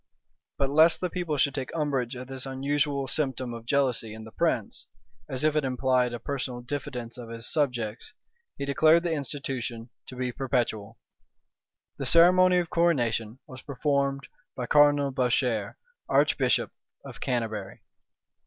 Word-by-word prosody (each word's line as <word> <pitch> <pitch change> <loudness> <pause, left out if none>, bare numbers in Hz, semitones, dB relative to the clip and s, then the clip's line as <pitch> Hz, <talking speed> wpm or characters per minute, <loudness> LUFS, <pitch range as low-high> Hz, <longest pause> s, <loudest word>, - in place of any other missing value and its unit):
But 140 -1 0
lest 160 +3 +5
the 180 -2 -2
people 170 -4 -2
should 140 0 +2
take 135 -2 -4
umbrage 135 -5 -1
at 125 0 -7
this 135 0 -6
unusual 140 +1 -1
symptom 130 -3 -1
of 115 0 -9
jealousy 125 -5 0
in 110 - -9
the 110 - -11
prince, - - -1 0.4
as 130 +1 -3
if 155 0 +2
it 150 - +2
implied 125 -1 +1
a 120 - -4
personal 130 -1 -4
diffidence 125 -2 -5
of 120 -2 -8
his 115 0 -5
subjects, 125 -8 -1 0.5
he 140 - -3
declared 155 +4 +4
the 170 -2 0
institution 130 -5 -4 0.2
to 130 - -9
be 125 0 -2
perpetual. 120 -5 -2 1.0
The - - -2
ceremony 180 +2 +6
of 175 -2 -1
coronation 120 -9 +1
was 130 -3 -11
performed 140 0 -1 0.3
by 125 - -3
Cardinal 145 0 +4
Bourchier, 125 -4 0 0.3
archbishop - - +2 0.3
of - - -10
Canterbury. 110 -6 -3
130 Hz, 145 wpm, -27 LUFS, 120-145 Hz, 1.0 s, ceremony